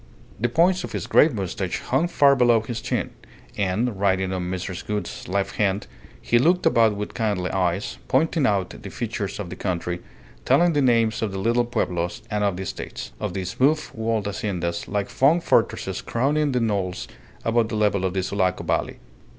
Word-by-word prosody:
The 120 Hz, +3 st, +1 dB
points 175 Hz, +6 st, +3 dB
of -, -, -6 dB
his -, -, -3 dB
grey -, -, +6 dB
moustache 95 Hz, -, -3 dB
hung 135 Hz, +7 st, 0 dB
far 140 Hz, -5 st, +5 dB
below 120 Hz, -3 st, +4 dB
his 115 Hz, +1 st, -5 dB
chin, -, -, -2 dB, 0.4 s
and, 100 Hz, +3 st, -1 dB
riding 95 Hz, -1 st, +1 dB
on 90 Hz, -1 st, -3 dB
Mrs. 95 Hz, 0 st, -4 dB
Gould's 105 Hz, 0 st, -4 dB
left 100 Hz, +2 st, -1 dB
hand, 100 Hz, -1 st, +1 dB, 0.3 s
he -, -, +2 dB
looked 175 Hz, +7 st, +3 dB
about 115 Hz, -3 st, +4 dB
with 105 Hz, +1 st, -5 dB
kindly 100 Hz, -5 st, -1 dB
eyes, 90 Hz, +1 st, -1 dB
pointing 145 Hz, +1 st, +2 dB
out 100 Hz, -3 st, 0 dB
the -, -, -7 dB
features -, -, -4 dB
of 85 Hz, -, -5 dB
the -, -, -5 dB
country, 90 Hz, -2 st, -2 dB, 0.4 s
telling 175 Hz, -, +4 dB
the 145 Hz, -, +2 dB
names 115 Hz, -4 st, +2 dB
of 110 Hz, -3 st, -1 dB
the 95 Hz, -, -5 dB
little 115 Hz, +4 st, +2 dB
pueblos 90 Hz, -7 st, -2 dB
and 105 Hz, 0 st, 0 dB
of 100 Hz, -3 st, +1 dB
the 95 Hz, -, -4 dB
estates, -, -, -6 dB
of 100 Hz, -3 st, -3 dB
the 95 Hz, -1 st, -2 dB
smooth 140 Hz, -, +2 dB
walled 110 Hz, -2 st, -1 dB
haciendas 95 Hz, -4 st, -3 dB
like 100 Hz, +3 st, -4 dB
long 150 Hz, +6 st, +6 dB
fortresses -, -, +1 dB
crowning 145 Hz, +5 st, +1 dB
the 125 Hz, -, +1 dB
knolls 100 Hz, -5 st, -1 dB, 0.4 s
above 115 Hz, 0 st, +2 dB
the 110 Hz, -, -3 dB
level 105 Hz, -3 st, +1 dB
of 95 Hz, 0 st, -1 dB
the 95 Hz, -, 0 dB
Sulaco 95 Hz, -1 st, 0 dB
Valley. -, -, -1 dB
105 Hz, 185 wpm, -24 LUFS, 95-120 Hz, 0.4 s, grey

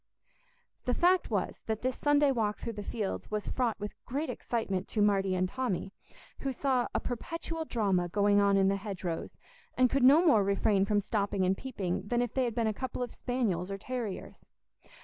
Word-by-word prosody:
The 250 Hz, -, +1 dB
fact 360 Hz, +1 st, +3 dB
was -, -, -2 dB
that 220 Hz, 0 st, -2 dB
this 255 Hz, 0 st, 0 dB
Sunday 290 Hz, -1 st, +3 dB
walk 215 Hz, -5 st, 0 dB
through 230 Hz, -, -5 dB
the 205 Hz, -, -6 dB
fields 205 Hz, -1 st, -4 dB
was 210 Hz, -1 st, -3 dB
fraught 240 Hz, -5 st, 0 dB
with 205 Hz, 0 st, -5 dB
great 285 Hz, +6 st, -2 dB
excitement 200 Hz, -5 st, -2 dB
to 220 Hz, -, -3 dB
Marty 195 Hz, -2 st, +2 dB
and 185 Hz, 0 st, +1 dB
Tommy, 200 Hz, -4 st, -3 dB, 0.5 s
who 270 Hz, -, -2 dB
saw 255 Hz, -1 st, +1 dB
a -, -, +3 dB
perpetual 325 Hz, +6 st, -4 dB
drama 195 Hz, -, +1 dB
going 205 Hz, +2 st, +3 dB
on 200 Hz, -1 st, +4 dB
in 195 Hz, -1 st, +4 dB
the 195 Hz, 0 st, +2 dB
hedgerows, 190 Hz, -5 st, -5 dB, 0.4 s
and 255 Hz, -1 st, +4 dB
could 275 Hz, -, +2 dB
no 295 Hz, +7 st, +7 dB
more 225 Hz, -, +5 dB
refrain 200 Hz, 0 st, +2 dB
from 205 Hz, 0 st, +2 dB
stopping 200 Hz, -2 st, 0 dB
and 185 Hz, +1 st, +2 dB
peeping 200 Hz, -7 st, -3 dB
than 240 Hz, +2 st, +1 dB
if 245 Hz, -, -4 dB
they 260 Hz, -1 st, +1 dB
had 235 Hz, -2 st, -3 dB
been 230 Hz, -, +1 dB
a 220 Hz, -, +1 dB
couple 250 Hz, +2 st, -4 dB
of 245 Hz, -, -6 dB
spaniels 210 Hz, -8 st, -1 dB
or 195 Hz, -, -3 dB
terriers. 230 Hz, -1 st, -5 dB
215 Hz, 195 wpm, -30 LUFS, 195-255 Hz, 0.5 s, no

